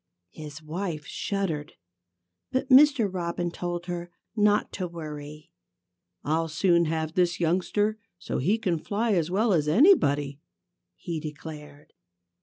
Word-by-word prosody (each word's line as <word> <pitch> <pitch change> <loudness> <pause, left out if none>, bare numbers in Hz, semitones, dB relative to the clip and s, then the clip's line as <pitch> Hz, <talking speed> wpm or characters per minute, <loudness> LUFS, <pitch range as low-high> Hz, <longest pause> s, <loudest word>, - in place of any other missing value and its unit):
His 150 0 -9
wife 160 -1 -4
shuddered. 170 -7 -3 0.8
But 260 0 -1
Mr. 275 -4 +6
Robin 175 -2 -3
told 175 0 -4
her 175 -1 -5 0.3
not 210 -1 +2
to 185 -2 -3
worry. 150 -3 -8 0.7
"I'll 160 +2 0
soon 170 +2 +3
have 160 0 -2
this 175 -1 +1
youngster 190 +5 +1 0.2
so 90 - -4
he 190 - +2
can 180 -7 -1
fly 220 +7 -1
as 170 -3 +1
well 205 +3 +2
as 150 -4 +1
anybody," 145 - +4 0.6
he 170 -3 -5
declared. 150 -1 -9
170 Hz, 125 wpm, -27 LUFS, 155-200 Hz, 0.8 s, Mr